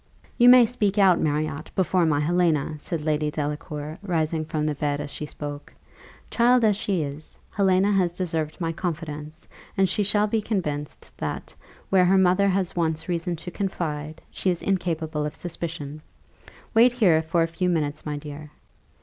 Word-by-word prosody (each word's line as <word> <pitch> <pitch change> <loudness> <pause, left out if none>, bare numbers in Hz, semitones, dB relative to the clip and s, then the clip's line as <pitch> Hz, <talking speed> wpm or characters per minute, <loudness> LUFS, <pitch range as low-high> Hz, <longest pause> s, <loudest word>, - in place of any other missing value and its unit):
"You 245 0 +6
may 250 -1 +9
speak 215 -4 -1
out, 190 -4 +5
Marriott, 155 0 -1
before 180 -2 +2
my 145 -2 +2
Helena," 160 -2 +1
said 165 +1 -4
Lady 150 -1 0
Delacour, 150 +1 -4
rising 160 -4 -1
from 155 -1 -2
the 155 - 0
bed 145 0 -1
as 145 -1 -5
she 150 - -6
spoke: 145 -1 -7 0.6
"child 245 +1 +4
as 210 -2 +4
she 190 -4 -1
is, 145 +2 -7
Helena 195 0 +3
has 180 -3 +1
deserved 160 -4 -2
my 165 -2 -1
confidence; 155 -3 -5 0.3
and 190 0 +4
she 185 - 0
shall 205 +1 +2
be 215 +1 0
convinced 150 -9 -3
that, - - -5 0.4
where 185 -2 +5
her 190 +2 +4
mother 190 +1 +4
has 190 -2 0
once 160 -2 -1
reason 175 0 -1
to 170 +2 -8
confide, 160 -6 -4
she 190 - 0
is 175 -2 -1
incapable 165 -5 -1
of 150 - -4
suspicion. 155 -4 -5 0.7
Wait 235 +2 +6
here 185 -10 +4
for 165 +1 +1
a - - 0
few 180 +2 -1
minutes, 150 -3 -1
my 150 -1 -3
dear." 150 0 -8
165 Hz, 170 wpm, -25 LUFS, 150-190 Hz, 0.7 s, may